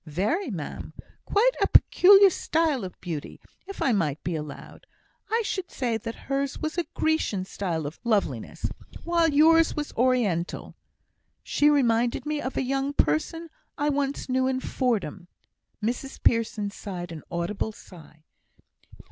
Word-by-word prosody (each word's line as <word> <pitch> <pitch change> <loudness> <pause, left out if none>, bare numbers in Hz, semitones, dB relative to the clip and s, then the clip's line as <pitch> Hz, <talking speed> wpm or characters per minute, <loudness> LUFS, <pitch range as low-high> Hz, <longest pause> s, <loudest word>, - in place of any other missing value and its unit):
"Very, 210 - -1
ma'am. 165 -9 -6 0.3
Quite 460 +5 +3
a - - +4
peculiar 390 +1 +7
style 310 - 0
of 185 -2 -8
beauty. 165 -5 -6 0.3
If 395 - -4
I 265 - +3
might 160 -9 0
be 175 - -2
allowed, 150 -2 -8 0.4
I 455 +1 +1
should 375 -2 -3
say 240 -4 -2
that 225 +1 -5
hers 275 0 -1
was 310 0 -3
a 345 -1 -1
Grecian 315 -12 0
style 170 -5 -3
of 145 +3 -7
loveliness, 170 - -1 0.4
while 335 -1 +2
yours 320 +2 +5
was 295 -1 -4
Oriental. 225 -9 0 0.7
She 295 - +3
reminded 240 -4 +2
me 300 -1 -2
of 260 - -4
a - - +1
young 270 +2 -1
person 300 - 0 0.3
I 295 +1 +1
once 280 -1 -1
knew 260 0 +1
in 260 0 0
Fordham." 205 - -2 0.6
Mrs 250 +4 -3
Pearson 220 -3 +1
sighed 180 -4 -7
an 160 -2 -7
audible 175 +5 -2
sigh. 160 -6 -15
245 Hz, 145 wpm, -26 LUFS, 180-300 Hz, 0.7 s, peculiar